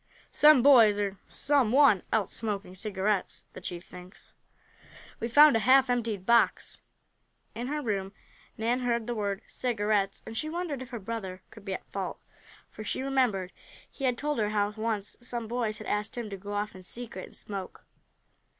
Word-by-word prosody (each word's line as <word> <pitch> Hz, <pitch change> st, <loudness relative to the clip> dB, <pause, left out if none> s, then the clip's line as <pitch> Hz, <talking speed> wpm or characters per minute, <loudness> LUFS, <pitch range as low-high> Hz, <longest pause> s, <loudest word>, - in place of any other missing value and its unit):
"Some 295 Hz, -4 st, +6 dB
boys 230 Hz, -7 st, +7 dB
or 200 Hz, -2 st, -2 dB
some 275 Hz, -6 st, +2 dB
one 265 Hz, -8 st, +6 dB
else 215 Hz, -4 st, 0 dB
smoking 205 Hz, -4 st, -3 dB
cigarettes, 200 Hz, 0 st, -2 dB
the -, -, -9 dB
chief 175 Hz, 0 st, -6 dB
thinks. 180 Hz, +1 st, -13 dB, 0.9 s
We 230 Hz, -, -2 dB
found 290 Hz, +3 st, +7 dB
a -, -, +4 dB
half 260 Hz, +2 st, +5 dB
emptied 225 Hz, -6 st, -1 dB
box." 235 Hz, +1 st, +2 dB, 0.7 s
In 240 Hz, +2 st, -4 dB
her 300 Hz, +2 st, -2 dB
room 195 Hz, -4 st, -2 dB, 0.5 s
Nan 235 Hz, +3 st, 0 dB
heard 235 Hz, -2 st, 0 dB
the 240 Hz, -, -2 dB
word 200 Hz, -3 st, -2 dB
"cigarettes" 205 Hz, -4 st, 0 dB
and 225 Hz, -, -8 dB
she 310 Hz, +7 st, -1 dB
wondered 325 Hz, -5 st, -3 dB
if 255 Hz, -, -8 dB
her 245 Hz, -, -5 dB
brother 190 Hz, -4 st, -6 dB
could 215 Hz, -2 st, -14 dB
be 195 Hz, -2 st, -2 dB
at -, -, -9 dB
fault, 195 Hz, -2 st, -4 dB, 0.5 s
for 215 Hz, -, -9 dB
she 235 Hz, -, -2 dB
remembered 245 Hz, -9 st, +1 dB, 0.4 s
he 275 Hz, -, -4 dB
had 250 Hz, -2 st, +1 dB
told 295 Hz, -1 st, -1 dB
her 210 Hz, -1 st, +1 dB
how 205 Hz, -1 st, +1 dB
once 215 Hz, -2 st, -3 dB
some 240 Hz, -1 st, -5 dB
boys 230 Hz, -2 st, -1 dB
had -, -, -9 dB
asked 210 Hz, +3 st, -2 dB
him 225 Hz, -3 st, -4 dB
to -, -, -3 dB
go 200 Hz, +2 st, -7 dB
off 205 Hz, +1 st, -2 dB
in 185 Hz, -, -11 dB
secret 200 Hz, 0 st, -7 dB
and -, -, -16 dB
smoke. 195 Hz, -3 st, -7 dB
220 Hz, 180 wpm, -29 LUFS, 200-245 Hz, 0.9 s, boys